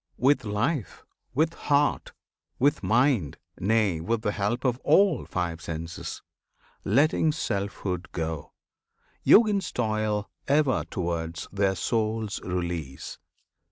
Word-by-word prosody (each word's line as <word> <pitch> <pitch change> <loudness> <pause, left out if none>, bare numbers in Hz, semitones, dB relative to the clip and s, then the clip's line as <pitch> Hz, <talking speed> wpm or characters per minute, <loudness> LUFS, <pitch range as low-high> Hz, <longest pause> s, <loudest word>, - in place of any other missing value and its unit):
With 135 +2 +3
life, 105 - -2 0.3
with 160 +4 +2
heart, 145 -2 +1 0.5
with 145 +4 +2
mind, 120 - +2 0.2
nay, 105 -4 +2
with 110 +6 -1
the 105 - +1
help 105 +6 -2
Of 125 -1 +1
all 160 0 +3
five 85 -2 -3
senses 80 0 -6 0.6
letting 150 +7 +3
selfhood 100 - -3
go 80 -2 -4 0.7
Yogins 210 -3 +5
toil 110 -2 -1 0.2
ever 140 -2 +2
towards 85 -3 -3
their 100 -1 +1
souls' 110 +2 -1
release. 85 -7 -4
110 Hz, 105 wpm, -27 LUFS, 90-135 Hz, 0.7 s, Yogins